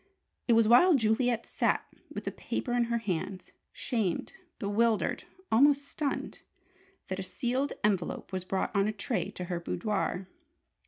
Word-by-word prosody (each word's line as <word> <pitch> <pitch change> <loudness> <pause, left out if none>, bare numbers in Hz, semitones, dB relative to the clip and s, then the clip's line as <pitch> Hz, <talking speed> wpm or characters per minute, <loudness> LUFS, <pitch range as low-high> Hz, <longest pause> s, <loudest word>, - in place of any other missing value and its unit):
It 235 - +5
was 225 -1 +5
while 300 +10 +7
Juliet 235 0 +2
sat - - 0 0.3
with - - -5
the - - -3
paper 245 - -3
in 240 -1 +3
her 235 0 0
hands, 185 -3 -3 0.2
shamed, 220 -9 -2 0.2
bewildered, 220 +1 +1 0.3
almost 280 +4 +5
stunned, 285 -1 -3 0.7
that 190 0 -3
a - - -2
sealed 255 +8 -1
envelope 195 -3 0
was 185 -1 -2
brought 190 +3 -2
on 200 +1 +3
a - - +1
tray 225 +3 -2
to 180 - -6
her 175 -1 -3
boudoir. 195 0 -2
220 Hz, 150 wpm, -30 LUFS, 195-245 Hz, 0.7 s, while